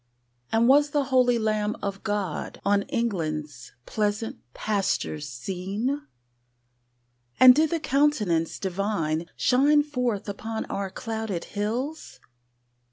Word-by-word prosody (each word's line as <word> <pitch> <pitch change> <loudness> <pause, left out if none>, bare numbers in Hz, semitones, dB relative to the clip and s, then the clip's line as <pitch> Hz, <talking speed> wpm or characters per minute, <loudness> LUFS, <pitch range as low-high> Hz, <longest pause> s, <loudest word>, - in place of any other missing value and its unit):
And 225 +1 +3
was 290 +2 +5
the 290 0 +1
holy 255 -3 +3
Lamb 215 -1 0
of 200 -1 -3
God 205 -6 -3
On 200 0 +3
England's 155 - -3
pleasant 210 +1 -2 0.2
pastures 195 -8 -1
seen? 195 - -3 1.4
And 255 -1 +10
did 310 +3 +3
the 335 - -1
Countenance 240 - +1
Divine 180 -4 -1
Shine 290 +4 +4
forth 250 -9 -2
upon 220 +2 -4
our 195 -1 -3
clouded 220 -2 -4
hills? 240 +10 -4
215 Hz, 105 wpm, -26 LUFS, 195-255 Hz, 1.4 s, And